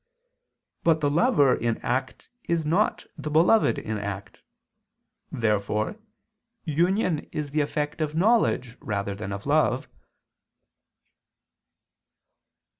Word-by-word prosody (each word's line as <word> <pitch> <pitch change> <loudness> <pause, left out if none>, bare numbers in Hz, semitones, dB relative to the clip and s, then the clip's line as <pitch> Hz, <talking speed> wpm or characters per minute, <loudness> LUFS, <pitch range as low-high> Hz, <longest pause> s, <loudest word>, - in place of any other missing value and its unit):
But 165 -1 +3
the 145 -2 +1
lover 150 - +4
in 115 -1 -1
act 130 +2 -3
is 170 -2 0
not 180 +8 +1
the 150 - -4
beloved 170 +9 +4
in 110 -1 -4
act. 100 -1 -6 0.9
Therefore 105 - -1 0.7
union 175 +1 0
is 150 -2 -4
the 150 +1 +1
effect 150 +2 -2
of 155 0 -2
knowledge 170 - +2
rather 100 -2 -2
than 100 0 -6
of 100 0 -6
love. - - +2
145 Hz, 105 wpm, -26 LUFS, 110-165 Hz, 0.9 s, lover